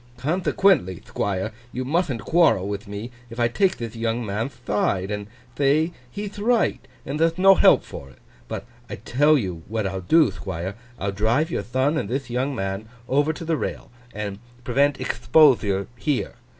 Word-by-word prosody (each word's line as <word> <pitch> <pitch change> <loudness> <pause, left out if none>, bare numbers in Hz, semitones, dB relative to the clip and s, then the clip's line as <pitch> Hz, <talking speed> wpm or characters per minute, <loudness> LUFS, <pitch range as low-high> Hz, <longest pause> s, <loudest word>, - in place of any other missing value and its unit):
Conthequently, 155 - +2
Thquire, 100 +2 -2 0.2
you 130 +1 -4
muthn't 145 - 0
quarrel 160 - +3
with 100 +1 -5
me 105 +4 -6 0.2
if 115 +1 -9
I 120 - +4
take 185 - +1
thith 115 -1 -6
young 115 +1 -1
man'th 110 +6 -3
thide, 100 -1 0
and 105 -1 -4 0.3
thay 145 +4 +3 0.2
he'th 205 0 -6
right 230 +2 +2 0.3
and 140 +3 -3
there'th 165 +1 +2
no 195 +1 +7
help - - +5
for 70 - -9
it. 65 - -19 0.3
But - - -5 0.2
I - - -4
tell 150 +4 +3
you 90 -9 -3
what 110 -1 -2
I'll 95 -1 -3
do, 155 - +4
Thquire; 90 0 -5 0.2
I'll 100 +1 -2
drive 115 - +1
your - - -1
thon 130 +6 0
and 100 - -4
thith 130 0 -3
young 130 +3 -1
man 95 +1 -4 0.2
over 145 +4 +2
to 165 +1 -7
the 160 -1 0
rail, - - -5 0.2
and 100 -1 -5 0.2
prevent 140 +4 +2
expothure 105 -11 +3
here. 140 +2 -1
120 Hz, 175 wpm, -23 LUFS, 100-155 Hz, 0.3 s, no